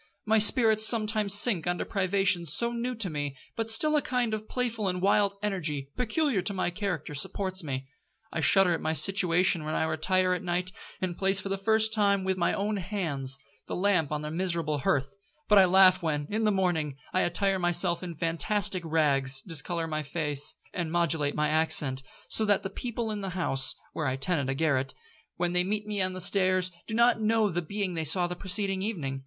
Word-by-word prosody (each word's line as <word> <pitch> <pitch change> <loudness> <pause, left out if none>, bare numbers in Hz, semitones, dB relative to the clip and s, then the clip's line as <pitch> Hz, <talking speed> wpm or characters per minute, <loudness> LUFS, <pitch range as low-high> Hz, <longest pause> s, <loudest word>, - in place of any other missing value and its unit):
My 220 0 +3
spirits 220 0 +6
sometimes 215 -3 +4
sink 205 -5 +4
under 175 0 -2
privations 185 -4 +1
so 235 +7 +1
new 240 +1 -3
to 220 -4 +5
me, 145 -4 -5 0.2
but 225 -1 -3
still 305 +8 +2
a 300 - +3
kind 245 -4 -1
of 215 0 -5
playful 230 -5 -2
and 180 -1 -2
wild 200 +1 +2
energy, 155 -9 -3
peculiar 250 - 0
to 200 +2 -1
my 185 -1 -1
character, 180 -6 -4
supports 185 +5 -2
me. 135 -3 -5 0.5
I 160 - -2
shudder 185 +3 +4
at - - -3
my 160 - -1
situation 180 +1 +2
when 155 +1 -4
I - - 0
retire 180 +4 +1
at 180 - -3
night, 180 +1 -2 0.3
and 180 -2 -2
place, 195 +1 +1
for 195 - -5
the 195 - 0
first 220 +1 +2
time 200 -3 +2
with 190 0 -1
my 175 -2 0
own 205 +1 -2
hands, 165 -9 -3 0.3
the - - -4
lamp 180 -6 +1
on 150 0 -2
the 150 - -5
miserable 165 -3 -2
hearth; 135 +2 -1 0.3
but 210 -1 +6
I 190 - +7
laugh 185 0 +5
when, 150 -3 -2
in 220 +1 -1
the 215 - +3
morning, 170 -7 -1 0.2
I 185 - +2
attire 195 +2 0
myself 175 0 0
in 175 -2 -7
fantastic 180 +5 0
rags, 140 -4 0
discolour 165 0 -2
my 155 -1 -3
face, 150 -1 -1 0.2
and 170 -3 -3
modulate 165 -4 0
my 150 0 +1
accent, 150 -4 +1 0.3
so 220 - +2
that 205 -2 +1
the 195 - -5
people 235 -2 -4
in 210 -1 -4
the 195 - -4
house, 135 -6 +1 0.2
(where 155 -3 -3
I 130 - -1
tenant 140 0 -1
a 135 - -1
garret), 135 -3 0 0.4
when 175 0 -1
they 180 0 +2
meet 210 +3 -3
me 210 -2 -2
on 185 0 -1
the 185 - -6
stairs, 185 0 +1 0.2
do 220 - -4
not 235 -1 +3
know 220 -1 +2
the 175 -1 -2
being 195 +2 -4
they 165 -1 -2
saw 175 +4 +1
the 175 0 -4
preceding 195 +1 0
evening. 155 -11 -4
185 Hz, 205 wpm, -27 LUFS, 160-205 Hz, 0.5 s, I